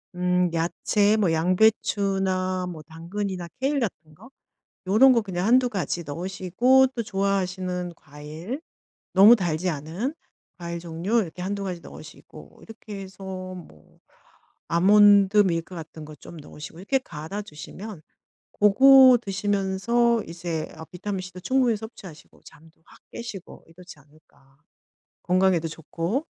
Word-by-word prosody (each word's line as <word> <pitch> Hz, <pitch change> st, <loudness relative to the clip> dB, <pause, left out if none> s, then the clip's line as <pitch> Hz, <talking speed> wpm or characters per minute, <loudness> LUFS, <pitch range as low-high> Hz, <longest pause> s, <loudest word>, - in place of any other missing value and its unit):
음 180 Hz, 0 st, +1 dB
야채 205 Hz, +5 st, +1 dB
뭐 190 Hz, -6 st, +2 dB
양배추나 185 Hz, 0 st, +1 dB
뭐 155 Hz, -2 st, -9 dB
당근이나 175 Hz, +3 st, -5 dB
케일 280 Hz, +2 st, 0 dB
같은 155 Hz, -8 st, -5 dB
거 255 Hz, -, -16 dB, 0.6 s
요런 235 Hz, +8 st, +6 dB
거 235 Hz, -, +2 dB
그냥 185 Hz, -1 st, -3 dB
1-2 250 Hz, +1 st, +4 dB
가지 175 Hz, -3 st, -3 dB
넣으시고 190 Hz, -, +2 dB
또 235 Hz, -, -2 dB
좋아하시는 185 Hz, -3 st, -2 dB
과일 155 Hz, -, -8 dB, 0.5 s
너무 205 Hz, +5 st, +8 dB
달지 175 Hz, -2 st, -1 dB
않은 170 Hz, -, -4 dB, 0.4 s
과일 170 Hz, -1 st, -6 dB
종류 175 Hz, +7 st, -1 dB
이렇게 180 Hz, -1 st, -7 dB
1-2 200 Hz, +2 st, -3 dB
가지 180 Hz, -2 st, -5 dB
넣으시고 -, -, -14 dB
이렇게 215 Hz, -3 st, -10 dB
해서 190 Hz, 0 st, -11 dB, 0.3 s
뭐 80 Hz, -, -15 dB, 0.7 s
아몬드 200 Hz, +3 st, +5 dB
밀크 180 Hz, -2 st, +1 dB
같은 160 Hz, -1 st, -9 dB
거 155 Hz, 0 st, -11 dB
좀 165 Hz, +4 st, -13 dB
넣으시고 150 Hz, +2 st, -11 dB
이렇게 265 Hz, +8 st, 0 dB
갈아 175 Hz, -1 st, -7 dB
주시면 190 Hz, +2 st, -10 dB, 0.5 s
고거 255 Hz, +4 st, +7 dB
드시면서 205 Hz, +4 st, 0 dB
이제 165 Hz, -1 st, -4 dB
아 160 Hz, -, -9 dB
비타민 190 Hz, +3 st, -5 dB
C도 185 Hz, 0 st, -10 dB
충분히 250 Hz, +1 st, +1 dB
섭취하시고 205 Hz, -7 st, -12 dB
잠도 160 Hz, +1 st, -18 dB
확 -, -, -19 dB
깨시고 215 Hz, -6 st, -9 dB
이렇지 175 Hz, -1 st, -14 dB
않을까 140 Hz, -2 st, -26 dB, 0.7 s
건강에도 180 Hz, -2 st, +2 dB
좋고. 165 Hz, -, -4 dB
185 Hz, 280 characters per minute, -24 LUFS, 165-210 Hz, 0.7 s, 너무